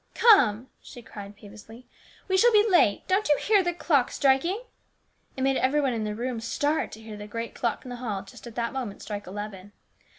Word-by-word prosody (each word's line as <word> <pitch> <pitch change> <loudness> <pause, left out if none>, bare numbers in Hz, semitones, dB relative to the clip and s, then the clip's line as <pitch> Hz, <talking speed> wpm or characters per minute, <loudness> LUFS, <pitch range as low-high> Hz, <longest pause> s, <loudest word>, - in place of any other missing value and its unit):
" - - -39
Come! 260 - +5
" - - -43
she 245 -3 -12
cried 205 -2 -10
peevishly, 215 +4 -14 0.2
" - - -27
we 380 - +1
shall 475 +6 +5
be 425 0 +5
late. 345 - +3
Don't 385 +1 +1
you 295 - +5
hear 420 -2 +3
the 350 -1 0
clock 300 -6 +1
striking? 295 - +1 0.4
" - - -41
It 260 - -2
made 270 0 +2
every 270 +3 +2
one 270 -4 +1
in 220 -2 -2
the 210 0 -3
room 240 +1 -3
start 290 +7 -1
to 220 - -10
hear 220 -1 -9
the 205 0 -8
great 230 +2 -5
clock 235 +1 -2
in - - -8
the 245 - -6
hall 210 -6 -4
just 195 - -13
at 230 - -11
that 235 -1 -2
moment 245 -7 -5
strike 205 -2 -6
eleven. 205 0 -8
245 Hz, 235 wpm, -26 LUFS, 210-295 Hz, 0.4 s, Come